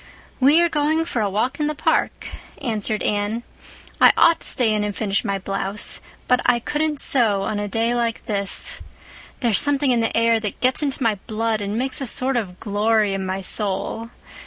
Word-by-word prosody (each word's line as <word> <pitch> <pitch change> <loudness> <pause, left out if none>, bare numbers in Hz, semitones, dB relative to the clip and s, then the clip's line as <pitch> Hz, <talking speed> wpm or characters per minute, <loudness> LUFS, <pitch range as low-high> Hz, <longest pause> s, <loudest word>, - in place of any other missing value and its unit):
"We 280 +5 +5
are - - +4
going 315 +1 0
for 240 -8 -2
a 205 - 0
walk 245 +9 -1
in 300 - +1
the 305 - -2
park," - - 0 0.3
answered 220 -5 -2
Anne. 210 +3 -1 0.6
"I - - +9
ought 335 -1 +5
to - - 0
stay 230 -4 +2
in 210 -1 0
and 205 -1 -3
finish 200 -3 -1
my 200 0 -1
blouse. 195 +1 -2 0.3
But 250 0 +3
I 245 - +3
couldn't 295 +4 -2
sew 220 -9 +2
on 205 +1 -2
a 205 - -3
day 225 +3 0
like 235 -1 -2
this. 200 -2 -2 0.6
There's 235 -5 +3
something 285 -2 +2
in 240 - +2
the 225 0 0
air 230 0 +3
that 210 -2 -5
gets 255 +3 +1
into 280 -2 -1
my 215 -4 +1
blood 220 -1 -1
and 205 +2 -3
makes 260 +3 -2
a 270 - -2
sort 260 +3 0
of 190 -7 -3
glory 210 0 +1
in 190 -1 -3
my 190 +1 -3
soul. 210 +3 -2
225 Hz, 200 wpm, -21 LUFS, 205-260 Hz, 0.6 s, I